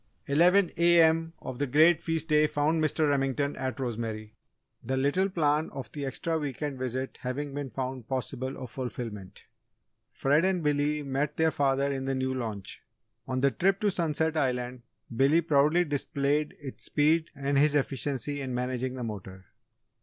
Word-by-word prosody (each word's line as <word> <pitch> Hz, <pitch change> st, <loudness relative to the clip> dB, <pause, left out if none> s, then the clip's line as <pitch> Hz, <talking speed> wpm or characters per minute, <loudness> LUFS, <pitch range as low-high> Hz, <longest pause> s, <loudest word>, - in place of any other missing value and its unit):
Eleven 175 Hz, +6 st, +4 dB
A.M. 165 Hz, -1 st, +4 dB
of 130 Hz, -1 st, -6 dB
the 145 Hz, -, 0 dB
great 160 Hz, +5 st, +5 dB
feast 165 Hz, 0 st, -2 dB
day 150 Hz, 0 st, +5 dB
found 155 Hz, +2 st, +1 dB
Mr. 155 Hz, 0 st, +2 dB
Remington 140 Hz, 0 st, 0 dB
at 130 Hz, -2 st, -4 dB
Rosemary, 110 Hz, -3 st, -4 dB, 0.5 s
the 130 Hz, 0 st, -1 dB
little 145 Hz, +9 st, +2 dB
plan 155 Hz, -3 st, +1 dB
of 130 Hz, -5 st, -7 dB
the 145 Hz, -2 st, -4 dB
extra 160 Hz, +4 st, -2 dB
week 145 Hz, -1 st, -4 dB
end 140 Hz, -3 st, -3 dB
visit 130 Hz, +1 st, -3 dB
having 135 Hz, +3 st, -3 dB
been 140 Hz, -1 st, -4 dB
found 130 Hz, -2 st, -5 dB
possible 130 Hz, 0 st, -3 dB
of 125 Hz, -3 st, -8 dB
fulfilment. 115 Hz, -6 st, -6 dB, 0.7 s
Fred 145 Hz, +6 st, +2 dB
and 185 Hz, -3 st, +1 dB
Billy 150 Hz, 0 st, +1 dB
met 140 Hz, +2 st, -2 dB
their 160 Hz, 0 st, +3 dB
father 140 Hz, -1 st, +1 dB
in 135 Hz, -1 st, -3 dB
the 135 Hz, 0 st, -1 dB
new 130 Hz, 0 st, -1 dB
launch. 110 Hz, -6 st, -5 dB, 0.5 s
On 130 Hz, 0 st, -1 dB
the 140 Hz, 0 st, +4 dB
trip 190 Hz, -, +1 dB
to 210 Hz, -1 st, +2 dB
Sunset 160 Hz, -2 st, 0 dB
Island, 125 Hz, -3 st, -1 dB, 0.3 s
Billy 140 Hz, +7 st, +4 dB
proudly 155 Hz, +1 st, +3 dB
displayed 145 Hz, 0 st, -1 dB
its 140 Hz, -3 st, -8 dB
speed 160 Hz, +2 st, +2 dB
and 140 Hz, 0 st, +1 dB
his 150 Hz, 0 st, +4 dB
efficiency 140 Hz, +1 st, -1 dB
in 130 Hz, -2 st, -3 dB
managing 125 Hz, +1 st, -2 dB
the 125 Hz, -, -5 dB
motor. 95 Hz, -4 st, -7 dB
140 Hz, 165 wpm, -28 LUFS, 130-155 Hz, 0.7 s, great